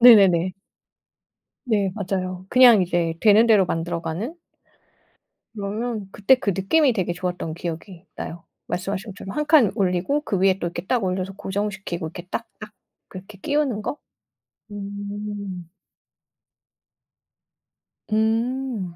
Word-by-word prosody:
네네네. 190 -7 +7 1.1
네 205 -6 +1
맞아요. 185 -2 -3
그냥 245 -5 +7
이제 170 -2 0
되는 215 +1 +6
대로 210 -4 +5
만들어가는. 170 - -3 1.2
그러면 215 +1 -3
그때 215 +6 +4
그 210 -5 -1
느낌이 260 +7 +3
되게 185 -5 -1
좋았던 175 -2 -3
기억이 175 +2 -7
나요. 165 0 -7 0.2
말씀하신 195 +3 -3
것처럼 195 0 -8
1 300 - 0
칸 295 - +5
올리고 190 +9 +1
그 205 -10 -2
위에 190 0 +3
또 175 - -1
이렇게 170 +1 -6
딱 245 -1 +1
올려서 185 +1 -2
고정시키고 195 -3 -3
이렇게 175 +2 -9
딱딱 215 -2 -6 0.4
그렇게 195 +2 -11
끼우는 285 -7 0
거. 290 - -4 0.7
음. 200 -3 -6 2.4
음. 225 -2 0
200 Hz, 255 characters per minute, -23 LUFS, 180-220 Hz, 2.4 s, 네네네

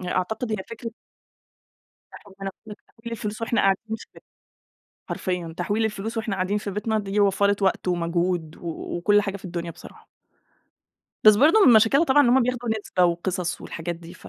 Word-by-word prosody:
أ 180 - -6
أعتقد 220 +6 -2
هي - - +1
فكرة 230 0 -6 1.2
حرفيًا 195 0 -10 0.4
تحويل 235 0 -6
الفلوس 215 -1 -5
وإحنا 230 -1 +1
قاعدين 195 +3 +1
في - - -11
بي - - -14 0.9
حرفيًا 180 -3 -3
تحويل 205 +5 0
الفلوس 220 +2 -4
وإحنا 220 -3 -2
قاعدين 190 +2 0
في 205 -1 -5
بيتنا 215 +2 -1
دي 200 0 -2
وفّرِت 200 0 +2
وقت 190 -1 +1
ومجهود 170 -1 -1
و 170 -2 -6
وكل 205 +4 +3
حاجة 200 0 -4
في 195 - -12
الدنيا 170 -1 -5
بصراحة. 170 - -15 1.2
بس 215 -1 +9
برضه 325 - +5
من 245 - +8
مشاكلها 225 +8 +5
طبعًا 290 -1 +5
إن 245 - +3
هم 255 +2 +5
بياخدوا 245 0 -2
نسبة 180 -3 +1
وقصص 175 0 -1
والحاجات 170 +1 -5
دي 170 +1 -12
ف - - -13
200 Hz, 170 wpm, -24 LUFS, 180-225 Hz, 1.2 s, بس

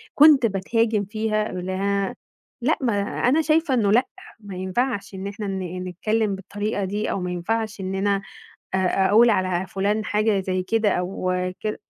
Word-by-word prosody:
كُنت 290 -4 +7
بتهاجم 215 +1 +1
فيها 215 0 -1
ل 180 -1 -5 1.0
لأ 300 +7 +2
ما 235 -4 +1
أنا 260 +9 +1
شايفة 310 -1 +2
إنه 210 -5 +2
لأ، 240 +4 +4 0.3
ما 200 -3 -9
ينفعش 200 +2 -2
إن 190 +1 -5
إحنا 205 0 -5
ن 185 -2 -4
نتكلم 215 +3 0
بالطريقة 205 +1 -3
دي 205 +3 -2
أو - - -1
ما 180 0 -3
ينفعش 215 +4 -2
إننا 195 +1 0 0.5
أ - - +4 0.3
أقول 230 +3 +6
على 185 -2 0
فُلان 205 +3 -1
حاجة 210 -1 +1
زي 185 -1 -1
كده 220 +2 +1
أو 185 0 -1 0.3
كد 215 0 -2
205 Hz, 155 wpm, -23 LUFS, 190-225 Hz, 1.0 s, كُنت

